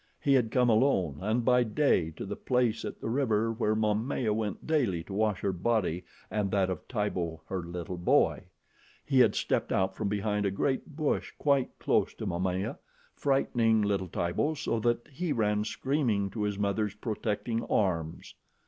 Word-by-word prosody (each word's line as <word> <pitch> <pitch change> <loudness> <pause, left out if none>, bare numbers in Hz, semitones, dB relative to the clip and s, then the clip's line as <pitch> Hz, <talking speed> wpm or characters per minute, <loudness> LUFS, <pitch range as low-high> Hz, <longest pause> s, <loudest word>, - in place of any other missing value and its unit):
He 140 - +2
had 125 -4 +3
come 125 +1 +3
alone 110 - +2
and 110 +4 0
by 125 -1 +5
day 115 - +2
to - - -5
the 100 +1 -4
place 125 -2 0
at - - -6
the - - -5
river 115 -4 +1
where 110 -2 0
Momaya 110 +2 0
went 105 -1 -3
daily 125 - +1
to 95 - -9
wash 105 -2 0
her 100 - +1
body 90 -3 0 0.3
and 105 -2 0
that 95 -1 +1
of 90 - -6
Tibo, 90 -8 -2
her 95 +1 -3
little 85 +1 -6
boy. 85 - +2 0.6
He 135 -2 +3
had 125 - +5
stepped - - 0
out 95 0 +1
from 105 - -2
behind 105 0 0
a - - +2
great 135 - -2
bush 155 -2 -1
quite 140 -3 +1
close - - +1
to - - -6
Momaya, 90 +2 -2 0.3
frightening 115 -5 +2
little 100 -2 0
Tibo 90 - -1
so 145 -6 -1
that 120 +1 0
he 160 +4 -3
ran 105 -3 +1
screaming 120 -10 0
to 110 - -4
his 105 -1 -1
mother's 100 0 -1
protecting 110 +1 -2
arms. 85 -6 -1
105 Hz, 175 wpm, -29 LUFS, 95-125 Hz, 0.6 s, by